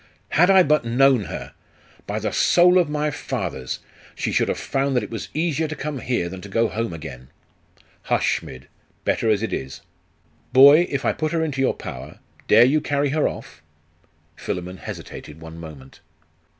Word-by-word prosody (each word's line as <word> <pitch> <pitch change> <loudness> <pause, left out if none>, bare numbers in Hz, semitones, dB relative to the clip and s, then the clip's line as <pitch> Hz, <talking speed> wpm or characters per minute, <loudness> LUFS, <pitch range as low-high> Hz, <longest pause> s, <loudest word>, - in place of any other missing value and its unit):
'Had 180 +4 +4
I 190 -1 +7
but 150 -2 +2
known 125 -1 +3
her! - - -7 0.5
By - - -3
the - - -2
soul 180 +1 +5
of 175 - +1
my 150 0 -1
fathers, 90 - -4 0.3
she - - -2
should - - +1
have - - -1
found 135 0 -1
that 125 - +1
it - - -8
was 115 - -6
easier 160 -1 0
to 155 - -5
come 150 -2 -4
here 120 -8 -1
than 95 +1 -8
to 100 - -10
go 115 +3 +1
home 115 -2 -3
again!' 75 -6 -9 0.8
'Hush, - - +1
Smid! 65 0 -11 0.4
Better 115 - +1
as 105 0 +2
it 110 - -3
is. 65 0 -5 0.7
Boy, 140 +6 +8
if 140 - -3
I - - +2
put 155 +1 -3
her 165 -1 +1
into 140 -4 -2
your 135 - +1
power, - - -8 0.3
dare 115 +3 +7
you 150 +4 +2
carry 145 0 0
her 150 +2 +1
off?' - - -8 0.7
Philammon 90 +1 -5
hesitated 75 -3 -9
one 80 0 -10
moment. 75 -5 -11
130 Hz, 180 wpm, -22 LUFS, 90-150 Hz, 0.8 s, Boy